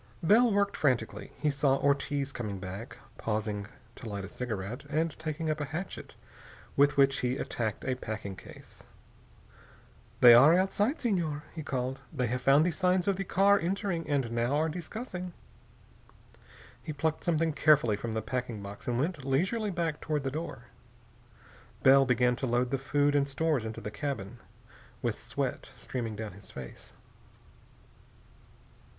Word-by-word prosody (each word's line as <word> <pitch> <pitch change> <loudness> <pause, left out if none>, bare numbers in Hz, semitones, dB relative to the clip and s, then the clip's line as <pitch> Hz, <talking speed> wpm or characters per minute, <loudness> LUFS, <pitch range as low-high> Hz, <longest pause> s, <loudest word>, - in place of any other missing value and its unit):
Bell 225 +7 +5
worked 200 0 +1
frantically. 125 -6 0
He 150 - +1
saw 140 -1 +2
Ortiz 140 0 0
coming 105 -7 -4
back, 95 +5 -7 0.2
pausing 105 -2 -2 0.3
to 115 - -8
light 100 -2 -4
a - - -9
cigarette, 110 -1 -5
and 160 +2 +1
taking 160 0 -3
up 155 0 -3
a - - -1
hatchet, 160 +6 -6 0.6
with 140 +1 +4
which 135 -1 +4
he 125 +1 0
attacked 110 -6 -3
a 130 - +1
packing 110 -5 -5
case. - - -13 1.4
"They 120 -1 +10
are 140 +8 +8
outside, 205 - +1
Senor," 170 - -1
he 160 - -5
called. 130 -2 -3
"They 135 -6 -1
have 125 +2 -2
found 140 +4 +5
the 180 - +2
signs 180 +2 +1
of 200 - +3
the 195 - -2
car 200 +2 +4
entering, 180 -1 -2
and 135 -5 0
now 120 +4 +1
are 160 +2 +2
discussing." 180 +2 -6 1.5
He 155 - -5
plucked 160 +2 -1
something 165 -2 +1
carefully 145 -8 +4
from 110 +2 -4
the 110 -1 -2
packing 125 -3 -3
box 100 +1 -9
and 120 -1 0
went 155 +2 -1
leisurely 190 - 0
back 170 -5 -2
toward 150 -3 -1
the 135 - -2
door. 145 -5 -5 1.2
Bell 135 0 +7
began 125 0 +3
to 130 - -2
load 120 +1 +1
the 135 - 0
food 145 +2 +2
and 140 -1 +2
stores 140 -3 0
into 110 0 -5
the 105 - -5
cabin, 120 -4 -4 0.6
with - - -1
sweat - - -3
streaming 115 -4 -4
down 110 0 -5
his 100 +2 -13
face. 65 -2 -10
140 Hz, 155 wpm, -30 LUFS, 120-160 Hz, 1.5 s, They